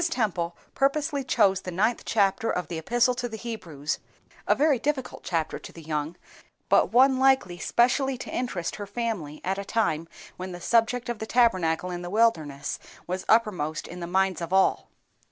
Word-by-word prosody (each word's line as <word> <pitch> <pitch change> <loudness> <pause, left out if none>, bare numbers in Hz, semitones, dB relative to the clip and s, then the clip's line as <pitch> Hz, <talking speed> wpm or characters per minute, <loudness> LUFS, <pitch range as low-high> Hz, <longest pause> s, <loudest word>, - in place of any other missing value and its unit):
Temple 180 - -1 0.2
purposely 280 +1 +1
chose 200 -7 +3
the - - -6
ninth 210 +7 0
chapter 205 +1 +1
of 180 - -2
the 165 - -3
Epistle 240 - +2
to 245 0 -3
the 220 - -6
Hebrews, 170 -11 -4 0.5
a - - +4
very 290 -3 +3
difficult 275 0 -2
chapter 165 -3 -2
to - - -11
the 165 - -12
young, 155 +1 -3 0.5
but - - +4
one 260 +2 +5
likely 265 -10 +3
specially 260 +2 +2
to - - -7
interest 200 -9 -2
her 205 -1 -6
family 205 -9 -4
at 190 +2 -1
a - - -3
time 180 -7 0 0.3
when 185 0 -6
the 175 - -7
subject 235 +5 +2
of 240 -3 -3
the 220 - -5
Tabernacle 185 -8 +2
in 175 0 -4
the 175 - -6
wilderness 165 -10 +1 0.3
was 185 +1 -4
uppermost 195 -9 +2
in 180 - -8
the 170 - -5
minds 190 -1 +1
of 170 0 -4
all. 190 0 +2
200 Hz, 180 wpm, -26 LUFS, 175-240 Hz, 0.5 s, one